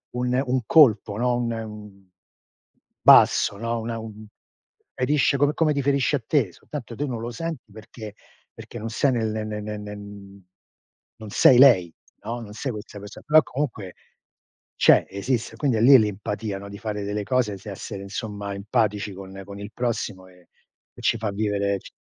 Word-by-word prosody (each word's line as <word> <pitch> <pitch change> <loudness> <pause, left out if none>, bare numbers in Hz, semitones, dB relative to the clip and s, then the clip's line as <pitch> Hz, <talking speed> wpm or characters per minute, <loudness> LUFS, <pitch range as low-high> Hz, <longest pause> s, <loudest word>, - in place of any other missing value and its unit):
un 125 +1 0
un 130 +1 0
colpo, 110 -8 +5
no, 125 0 +1
un, 120 0 -1
mhmm 105 -3 -7 1.0
basso, - - +6
no, 115 +2 -2
una 115 0 -4
un 110 -1 -9 0.7
ferisce 140 +2 +2
come 145 +2 +2
come 155 -2 +2
ti 140 - -1
ferisce 140 +1 +2
a 130 - -4
te, 125 - +1
soltanto 120 - -9
te 145 - -2
non 125 -5 -4
lo 115 +1 -5
senti 145 -3 -6
perché 110 0 -11 0.4
perché 120 - -10
non 110 +1 -5
sei 135 +4 +1
nel 115 -3 0
ne 110 0 -3
ne 105 0 -5
ne 105 0 -5
ne 105 0 -8 1.2
non 110 -2 -10
sei 125 +4 +5
lei, 95 - +6 0.3
no, 115 +3 -4
non 105 -3 -10
sei 125 +5 -4
questa 105 -2 -9
perso 105 +1 -10
però 155 +1 +6
comunque 120 -9 -4 0.8
c'è, - - +5
esiste. 115 +4 -2
Quindi 130 -3 +1
è 110 - 0
lì 135 +3 +8
l'empatia, 105 0 -3
no, 100 - -9
di 100 - -9
fare 105 -2 -4
delle 105 +1 -3
cose, 115 -5 0
essere 100 -1 -7
insomma 100 0 -5
empatici 105 -1 -1
con 95 0 -10
con 100 0 -10
il 100 +1 -8
prossimo 110 -6 -3
e 90 -1 -21 0.5
e - - -10
ci - - +1
fa 110 -1 -3
vivere 100 -1 -1
ci - - -14
110 Hz, 175 wpm, -24 LUFS, 105-125 Hz, 1.2 s, lì